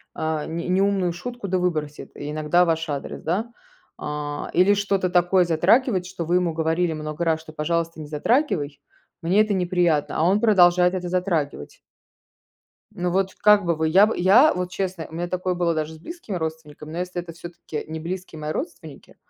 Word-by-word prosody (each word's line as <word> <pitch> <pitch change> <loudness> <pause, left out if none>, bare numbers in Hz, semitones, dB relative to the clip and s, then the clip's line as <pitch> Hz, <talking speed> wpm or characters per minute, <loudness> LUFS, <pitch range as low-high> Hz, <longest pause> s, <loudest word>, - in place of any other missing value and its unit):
а, 155 -1 -2
не 170 +2 -4
неумную 190 -1 +1
шутку 240 +4 -6
да 185 0 0
выбросит 155 -5 -3
и 145 +1 -5
иногда 155 +3 +2
в - - 0
ваш 165 0 -1
адрес. 140 -2 -5
Да? 210 +8 -2 0.5
А, 150 0 -4
или 185 +3 +5
что-то 200 -2 0
такое 180 +1 +3
затрагивает, 185 +4 +2
что 185 -2 -5
вы 175 +2 +1
ему 180 -2 +1
говорили 165 +1 0
много 155 +1 -4
раз, 160 -1 +1
что: 160 -1 -13
"Пожалуйста, 165 +1 -2
не 150 - -8
затрагивай- 155 - 0 0.4
мне 180 +5 +3
это 215 -1 +1
неприятно". 175 -5 +1
А - - +2
он 195 +5 +3
продолжает 180 -4 +5
это 180 -1 -3
затрагивать. 175 - -2 1.1
Ну 180 0 -2
вот 190 +1 0
как 210 -1 +5
бы 170 -1 +1
вы, 160 0 0
я 190 +6 +6
б 215 - -1
я 210 - +6
вот, 180 0 -3
честно, 185 -3 -4
у - - -15
меня 175 +2 -3
такое 185 +1 -2
было 175 -1 0
даже 155 0 -3
с - - -11
близкими 335 - -7
родственниками, 160 -2 -6
но 165 - -6
если 180 0 -3
это 170 -1 -10
всё-таки 165 -2 -8
не 160 0 -5
близкие 175 -1 -6
мои 150 0 -3
родственники, 290 - -7
175 Hz, 190 wpm, -23 LUFS, 160-185 Hz, 1.1 s, я